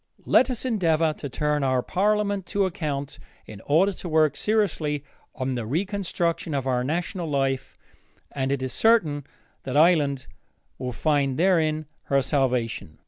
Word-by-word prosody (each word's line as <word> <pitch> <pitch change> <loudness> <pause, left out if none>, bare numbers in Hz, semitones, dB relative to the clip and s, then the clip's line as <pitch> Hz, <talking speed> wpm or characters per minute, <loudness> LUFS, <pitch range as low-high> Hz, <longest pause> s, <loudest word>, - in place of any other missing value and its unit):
Let 260 - +4
us 250 0 -3
endeavor 165 -9 +2
to 145 - -7
turn 150 +2 0
our 130 -2 +1
parliament 205 -1 0
to 200 -1 +1
account 145 -6 -4 0.3
in 105 -3 -11
order 170 +7 +4
to 180 -2 -7
work 155 -2 +3
seriously 170 -9 0 0.3
on 130 0 -2
the 120 -3 -4
reconstruction 170 - -1
of 135 -2 -2
our 125 -2 0
national 170 +3 -2
life, 135 -2 -1 0.5
and 135 -1 -2
it 140 -2 -1
is 130 - -3
certain 160 - +2 0.3
that 135 +1 -3
Ireland 150 -5 +3 0.5
will 125 -1 -3
find 140 0 0
therein 160 -3 +2 0.2
her 140 -1 +2
salvation. 125 - -1
150 Hz, 145 wpm, -25 LUFS, 135-180 Hz, 0.5 s, Let